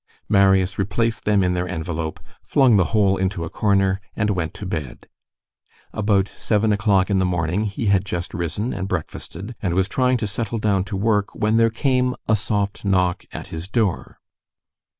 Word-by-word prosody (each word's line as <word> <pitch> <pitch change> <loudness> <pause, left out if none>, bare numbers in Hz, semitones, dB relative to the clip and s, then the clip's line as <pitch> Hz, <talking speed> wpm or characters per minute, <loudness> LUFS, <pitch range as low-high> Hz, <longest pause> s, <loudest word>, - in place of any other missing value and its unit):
Marius 95 -1 +3
replaced 110 +4 -1
them 105 -2 +3
in 90 0 +1
their 90 0 -1
envelope, 80 -2 -4 0.2
flung 130 -5 +4
the 95 -3 +4
whole 100 -2 +2
into 95 -2 -1
a 80 - -6
corner 95 -2 +1
and 105 0 +1
went 85 -5 -2
to 105 - -7
bed. 75 -9 -5 0.9
About 100 -2 +2
seven 105 +1 0
o'clock 100 -2 +2
in 95 - +3
the - - +2
morning, 90 +3 0
he 105 +3 -3
had 100 -2 +3
just 90 -3 -4
risen 90 +5 -2
and 95 -1 -3
breakfasted, 95 +3 -5
and 90 -4 -1
was 95 0 +2
trying 125 +3 +2
to 110 - -2
settle 110 +2 -3
down 100 -3 +1
to 100 -1 -4
work, 105 0 0
when 110 +1 +1
there 115 0 +5
came 125 +2 +1
a 110 - +4
soft 100 -1 -2
knock 90 -3 +1
at - - -8
his 80 +2 -6
door. 105 -3 -1
100 Hz, 180 wpm, -22 LUFS, 90-105 Hz, 0.9 s, there